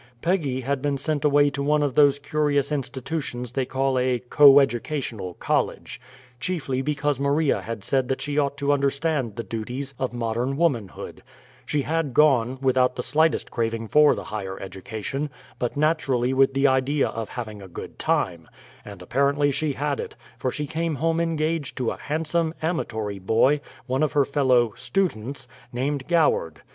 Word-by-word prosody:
Peggy 155 -7 0
had 135 +1 -2
been 145 -1 0
sent 145 +1 -2
away 145 -1 +4
to 140 0 -4
one 150 +1 +2
of 140 -3 0
those 145 0 +5
curious 145 0 0
institutions 130 -3 -3
that - - -23
they 135 -2 +1
call 135 0 0
a 125 0 +1
"coeducational 130 - +3
college," - - -2 0.4
chiefly 135 -6 -2
because 145 -1 -1
Maria 140 +2 +1
had 115 -3 -6
said 130 +1 0
that 135 - -1
she 145 -1 -3
ought 145 -1 +1
to 140 0 +1
understand 140 -4 0
the 115 - -4
duties 125 +5 -5
of 130 - -1
modern 120 +3 -2
womanhood; 130 - -2 0.5
she 145 -2 0
had 160 -4 -1
gone, 130 -4 +4
without 130 -1 +3
the - - -3
slightest 160 +1 +1
craving 115 -1 -2
for 150 +4 +5
"the - - -6
higher 95 -3 -5
education," 110 +9 -5 0.3
but 120 +2 -2
naturally 140 -5 +1
with 135 0 +3
the 135 +1 +2
idea 135 +2 +2
of 115 -1 -5
having 110 -4 -6
a 95 - -10
"good 90 - -9
time"; 85 -3 0 0.4
and 100 -3 -10
apparently 140 +7 +2
she 150 +1 -1
had 145 +1 -2
it, - - -6 0.2
for 130 - -2
she 150 +4 -3
came 160 +1 -2
home 165 +4 0
engaged 160 -2 -1
to 125 -3 0
a - - -6
handsome, 160 +2 -1
amatory 110 - -2
boy, 115 +9 +3 0.2
one 130 +2 -1
of 155 - +1
her 145 -2 +3
fellow 130 -5 +2
"students," 135 - -2 0.2
named 135 +2 -2
Goward. 155 - +1
135 Hz, 170 wpm, -24 LUFS, 120-150 Hz, 0.5 s, those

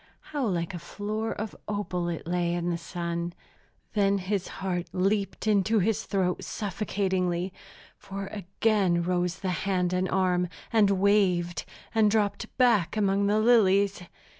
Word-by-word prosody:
How 280 -5 0
like 170 -3 -1
a 175 - -5
floor 210 +5 -3
of 215 -1 -5
opal 185 -4 -2
it 170 - -4
lay 175 0 0
in 175 0 -1
the 170 - -1
sun; 170 0 -4 0.6
then 200 -1 +3
his 195 0 -2
heart 180 -2 -3
leaped 195 +3 0
into 215 +1 +3
his 215 +2 +1
throat 185 -3 0
suffocatingly, 190 -3 -1 0.5
for 195 0 -6
again 195 -2 +1
rose 180 0 0
the 185 - -1 0.2
hand 180 -2 +1
and 185 +1 0
arm, 180 -1 +2 0.3
and 215 -3 +5
waved, 190 -3 +2 0.3
and 220 -2 +4
dropped 205 -1 0
back 230 -7 +3
among 200 -1 +2
the 210 +1 +3
lilies! 200 -4 +4
195 Hz, 140 wpm, -27 LUFS, 180-205 Hz, 0.6 s, and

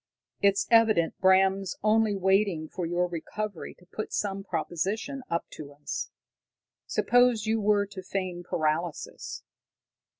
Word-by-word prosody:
"It's 200 0 +3
evident 220 -8 +4
Bram's 190 0 +3
only 215 -1 +3
waiting 190 -4 +2
for 175 +1 -4
your 175 +1 +1
recovery 180 +3 -5
to 180 - -22
put 215 +4 -6
some 195 -1 -2
proposition 195 - -2
up 170 - -1
to 145 -2 -9
us. 145 0 -5 0.8
Suppose 245 -3 +3
you 220 0 +1
were 205 0 +3
to 200 -1 -9
feign 185 -1 -3
paralysis." 160 -1 -3
195 Hz, 125 wpm, -28 LUFS, 175-215 Hz, 0.8 s, evident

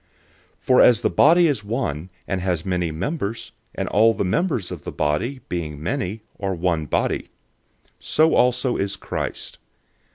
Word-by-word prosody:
012:012 - - -22
For 125 -1 +5
as 120 -2 +6
the - - +2
body 170 +4 +5
is 140 -9 0
one, 100 - -3 0.2
and 95 -2 -2
has 90 -2 -1
many 90 -3 0
members, 100 - -4 0.2
and - - -2
all 115 +3 +4
the - - -1
members 115 - 0
of 85 -5 -7
the - - -5
body, 80 - -1
being 80 -4 -4
many, 90 +7 -3 0.2
are 95 -1 -2
one 85 -3 -1
body; - - -1 0.7
so 160 +1 +2
also 125 0 +2
is 100 0 -1
Christ. 95 - -5
100 Hz, 160 wpm, -22 LUFS, 85-125 Hz, 0.7 s, as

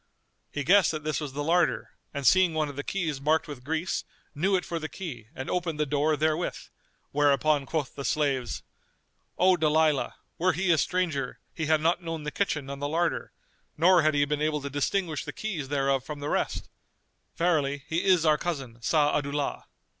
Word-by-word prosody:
He 145 - -3
guessed 190 +5 +5
that 155 -1 -4
this 155 -2 -1
was 145 -3 -5
the 145 +1 -3
larder 170 +3 +1 0.2
and 140 -1 -4
seeing 185 +1 +5
one 155 -2 0
of 140 - -8
the 145 - -4
keys 160 -8 -2
marked 155 +3 +2
with 140 -4 -8
grease, 160 +5 -1 0.3
knew 190 +6 +1
it 180 - 0
for 170 - -3
the 155 0 -5
key 125 - -7
and 130 - -5
opened 170 -4 -2
the 150 - +2
door 150 +2 +1
therewith; 155 +3 0 0.5
whereupon 145 0 +2
quoth 155 -4 -2
the 140 - -6
slaves, 135 -5 0 0.7
"O 185 +1 +5
Dalilah, 155 -3 +2 0.2
were 185 +2 +3
he 180 +2 +1
a 160 - +4
stranger, 175 -7 -1
he 160 -2 -3
had 155 -1 +3
not 170 +3 +2
known 165 -2 -5
the 150 - -3
kitchen 150 -8 -1
and 140 0 -6
the 145 - -1
larder, 165 +2 0 0.5
nor 175 +2 +6
had 155 -1 +2
he 145 0 +3
been 150 0 -2
able 150 -1 0
to 140 0 -5
distinguish 155 +2 -1
the - - -6
keys 180 -11 -4
thereof 135 -2 +1
from 150 +1 -7
the 145 +1 -4
rest; - - -1 0.7
verily, 145 -5 +1
he 165 +2 -1
is 180 -4 +4
our 155 -1 +4
cousin 135 -9 -4
Sa'adu'llah." 145 +1 0
155 Hz, 190 wpm, -27 LUFS, 145-170 Hz, 0.7 s, nor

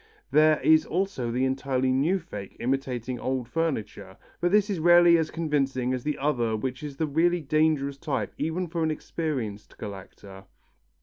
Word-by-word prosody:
There 155 0 +5
is 155 0 +5
also 175 -8 -2
the 125 +3 0
entirely 130 -1 0
new 145 +9 +2
fake 105 - -9
imitating 125 -1 -2
old 130 -2 -2
furniture, 155 - -3 0.2
but 175 0 +1
this 205 0 +4
is 200 -5 -2
rarely 175 +1 +6
as 160 -2 +1
convincing 135 -6 -1
as 125 -1 -3
the 150 0 -2
other 120 -6 0
which 130 +3 -4
is 145 -2 -7
the 160 - 0
really 170 +4 +1
dangerous 150 -2 +1
type 135 - -3
even 160 +5 -1
for 165 0 -3
an 160 - +1
experienced 135 -10 -4
collector. 100 -1 -10
140 Hz, 165 wpm, -26 LUFS, 125-160 Hz, 0.2 s, rarely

